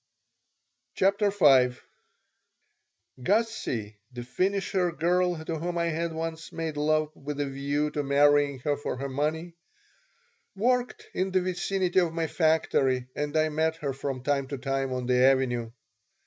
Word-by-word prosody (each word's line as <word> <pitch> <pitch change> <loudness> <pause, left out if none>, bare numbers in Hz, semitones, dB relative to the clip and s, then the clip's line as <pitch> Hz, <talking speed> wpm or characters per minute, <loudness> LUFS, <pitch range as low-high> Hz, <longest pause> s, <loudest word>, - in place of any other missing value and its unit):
CHAPTER 200 +2 +2
V 135 -10 +4 1.4
GUSSIE, 130 - -1
the 120 -1 -7
finisher 185 +5 0
girl 175 0 0
to 160 -1 -3
whom 175 +2 -3
I 170 0 +1
had 165 +1 -2
once 160 0 -5
made 160 -2 -4
love 155 +1 0
with 145 +1 -6
a 145 - +1
view 140 +2 -1
to 150 - -2
marrying 145 0 +3
her 145 +2 0
for 140 - -4
her 140 +2 -4
money, 155 +5 -2 1.0
worked 245 +4 0
in 190 +1 -1
the 185 0 +1
vicinity 185 0 0
of 170 -3 0
my 165 -1 0
factory 140 -6 +1
and 150 +1 -2
I 155 0 +3
met 160 +1 0
her 145 -4 -3
from 135 -1 -4
time 140 -1 0
to 140 - -5
time 135 0 -2
on 125 -1 -3
the 125 0 +3
Avenue. 130 -3 +2
150 Hz, 150 wpm, -27 LUFS, 135-175 Hz, 1.4 s, V